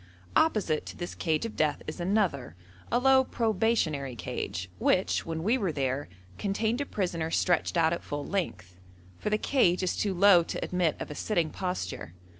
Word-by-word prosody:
Opposite 210 - +2
to - - -8
this 175 - -5
cage 160 +3 0
of 225 - -6
death 150 -2 0
is 155 - -6
another, 175 - 0 0.4
a 240 - +3
low 265 +1 +5
probationary 210 - 0
cage, 95 -4 -4
which, 185 -2 +1
when 160 0 -3
we 235 +7 +2
were 195 -6 0
there, 135 - -2 0.3
contained 220 +5 0
a 285 - -3
prisoner 170 -5 -2
stretched 175 +1 +1
out 165 0 +4
at 170 - -3
full 145 0 -4
length, 90 - -4 0.4
for - - -2
the 215 - +2
cage 190 -8 +2
is 185 - 0
too 200 -3 -1
low 190 -1 +7
to 165 - -4
admit 180 -4 +1
of - - -6
a - - -3
sitting 170 -5 0
posture. 180 - -4
175 Hz, 180 wpm, -29 LUFS, 155-215 Hz, 0.4 s, low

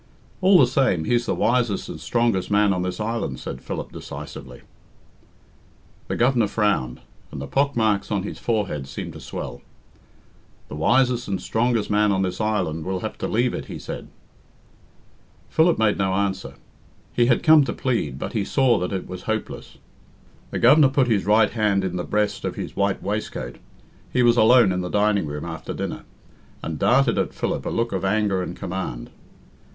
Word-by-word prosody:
"All 190 0 +6
the 135 - +7
same, 125 -9 +1
he's 120 +7 0
the - - 0
wisest 120 -4 +1
and - - -8
strongest 115 -6 0
man 105 -1 +3
on 90 - -1
this 90 0 -3
island," 115 +2 -3
said - - -7
Philip - - -5
decisively. 65 -3 -9 1.4
The - - -2
Governor 120 -2 +3
frowned, 100 - 0 0.3
and 75 - -6
the 70 - -5
pockmarks 110 - +1
on 100 -2 -1
his - - -6
forehead 100 - -2
seemed 70 - -6
to - - -10
swell. - - -7 1.1
"The - - -6
wisest 125 +8 +2
and 95 -2 -2
strongest 115 -2 0
man 105 0 +3
on 95 -1 +1
this 95 +3 -3
island 90 -7 -1
will 95 +1 -3
have 110 - -4
to - - -2
leave 120 +2 +1
it," - - -5
he - - -7
said. - - -7 1.4
Philip 165 +1 +3
made 110 -2 +2
no 95 -1 +1
answer. 95 -1 -2 0.6
He 120 -1 +3
had 120 - +2
come 155 -2 +7
to - - -2
plead, 110 - -1
but - - -5
he 110 -4 0
saw 125 +2 +2
that 90 - -3
it 95 -2 -3
was 90 0 -7
hopeless. 110 0 -4 0.7
The - - -4
Governor 135 +3 +6
put 130 -2 +2
his 100 -4 +1
right 105 0 +4
hand 105 -4 +1
in 90 -1 -2
the 90 - -2
breast, 105 +1 -1
of - - -3
his - - -6
white 100 -1 0
waistcoat 100 - -4 0.5
he 125 - +2
was 120 -1 +5
alone 120 -2 +6
in 90 0 -1
the 90 - -4
dining 105 -3 +1
room 75 +1 -5
after 80 -1 -6
dinner - - -5 0.6
and 80 -2 -4
darted 125 -1 +3
at - - -2
Philip - - -2
a - - 0
look 115 0 -1
of 95 -1 -2
anger 100 -1 +1
and 90 -1 -5
command. 85 -10 -5
105 Hz, 180 wpm, -23 LUFS, 95-120 Hz, 1.4 s, the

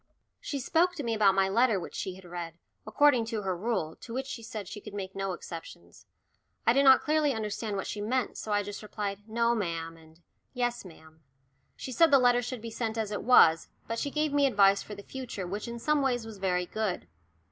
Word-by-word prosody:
She 280 - -4
spoke 340 +7 +2
to 295 - -4
me 230 -2 -1
about 205 -3 +4
my 195 0 +3
letter 225 +1 +3
which - - -8
she 185 - -4
had 190 0 -14
read, 170 -1 -7 0.3
according 255 +1 +4
to 225 -2 -3
her 190 -1 -1
rule, 185 -5 -2
to 230 - -9
which 265 +1 -2
she 255 - -6
said 220 -4 -7
she 205 +2 -8
could 210 -1 -10
make 190 -1 -5
no 195 -1 -2
exceptions. 165 - -10 0.6
I 230 - +5
did 275 +2 +3
not 265 -1 +7
clearly 300 -2 +2
understand 215 -1 -3
what 195 - -3
she 205 - -4
meant, 250 +4 -1
so 215 - -6
I 205 0 +2
just 205 0 -7
replied 205 -2 -4
"No, 235 +1 +2
ma'am," 165 -6 -3
and 160 0 -19 0.4
"Yes, 245 -1 -1
ma'am." 160 -2 -15 0.5
She 260 - -7
said 330 +7 +5
the 280 - +7
letter 245 -1 +4
should 245 -1 -5
be 230 - -6
sent 225 0 -3
as 220 -2 -2
it 205 - -3
was, 165 -10 +5 0.2
but 230 0 -3
she 285 - -2
gave 300 0 -1
me 285 -1 +4
advice 200 -4 +4
for 210 - -8
the 200 - -10
future 250 -8 -6
which 205 +6 -5
in 235 0 -5
some 300 +5 +1
ways 245 -4 0
was 220 -3 -9
very 180 -2 0
good. 205 - -3
215 Hz, 225 wpm, -29 LUFS, 195-245 Hz, 0.6 s, not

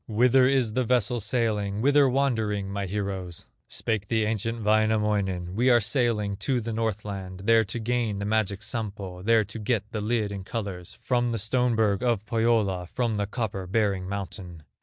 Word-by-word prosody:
Whither 125 +3 +4
is 130 -5 +2
the 130 +2 +1
vessel 120 0 +2
sailing, 105 -2 0
Whither 140 +2 +4
wandering, 110 -7 0
my 100 -1 -3
heroes?" 95 -3 -4 0.2
Spake 105 -3 -2
the 110 0 +1
ancient 115 +1 -2
Wainamoinen: 105 -4 +1
"We 125 +4 +3
are 120 -1 +6
sailing 110 -4 0
to 125 +4 0
the 115 0 -4
Northland, 100 -4 -4
There 115 +1 +5
to 100 - -5
gain 115 -2 -1
the 100 - -3
magic 105 -1 0
Sampo, 100 -6 -4
There 115 +2 +4
to 110 +3 -8
get 105 -1 0
the 110 - -3
lid 110 -1 0
in 100 -1 -5
colors, 95 -4 -6
From 120 -1 +1
the 115 - -1
stone 120 +3 +1
berg 110 -2 +2
of 120 -4 0
Pohyola, 110 -5 +1
From 115 +1 -1
the 105 -1 -1
copper 105 -4 -3
bearing 95 -2 0
mountain." 95 -4 -6
110 Hz, 175 wpm, -26 LUFS, 100-115 Hz, 0.2 s, are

